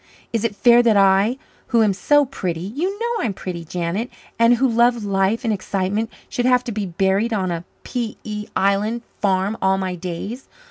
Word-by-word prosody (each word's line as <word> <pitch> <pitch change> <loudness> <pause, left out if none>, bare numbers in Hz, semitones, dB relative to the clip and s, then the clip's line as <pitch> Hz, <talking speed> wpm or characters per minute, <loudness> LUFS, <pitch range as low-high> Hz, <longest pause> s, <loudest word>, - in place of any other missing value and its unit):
Is 230 -1 0
it 225 -3 -1
fair 240 +2 +6
that 230 -3 +3
I, 195 +5 +4 0.3
who 230 -2 +3
am 205 -2 +3
so 290 +9 +3
pretty 185 -11 -4
you 305 - -3
know 470 +1 -2
I - - 0
am 200 - -4
pretty, 175 -3 -6
Janet 175 +7 -3 0.3
and 230 +1 +6
who 265 +3 +2
love 235 -1 +2
life 195 +4 +1
and 225 -2 +1
excitement, 200 +2 -2 0.2
should 245 0 -1
have 250 -1 +4
to 245 - -4
be 205 -2 -3
buried 195 +6 +1
on 190 -4 -1
a 170 0 -4 0.2
P.E. 215 -3 -5
Island 205 +5 +1 0.2
farm 195 +2 +1
all 190 0 +3
my 190 -1 -2
days? 180 +8 -6
210 Hz, 190 wpm, -21 LUFS, 190-235 Hz, 0.3 s, fair